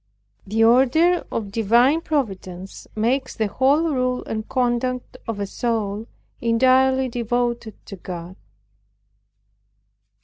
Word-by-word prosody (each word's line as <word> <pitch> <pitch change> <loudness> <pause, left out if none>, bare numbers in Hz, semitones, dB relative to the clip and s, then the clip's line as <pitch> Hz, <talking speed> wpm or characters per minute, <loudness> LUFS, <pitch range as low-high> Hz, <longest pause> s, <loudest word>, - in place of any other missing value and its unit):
The 220 +3 +2
order 270 +9 +4
of 210 -3 -3
divine 235 +8 +3
providence 195 - -4
makes 250 +5 0
the 220 - 0
whole 265 +9 +2
rule 255 -1 0
and 220 0 -5
conduct 255 -1 -1
of 225 -3 -3
a 200 - -1
soul 220 0 -2 0.3
entirely 260 +3 +3
devoted 240 -2 -2
to 195 - -9
God. 175 0 -8
235 Hz, 105 wpm, -22 LUFS, 215-260 Hz, 0.3 s, order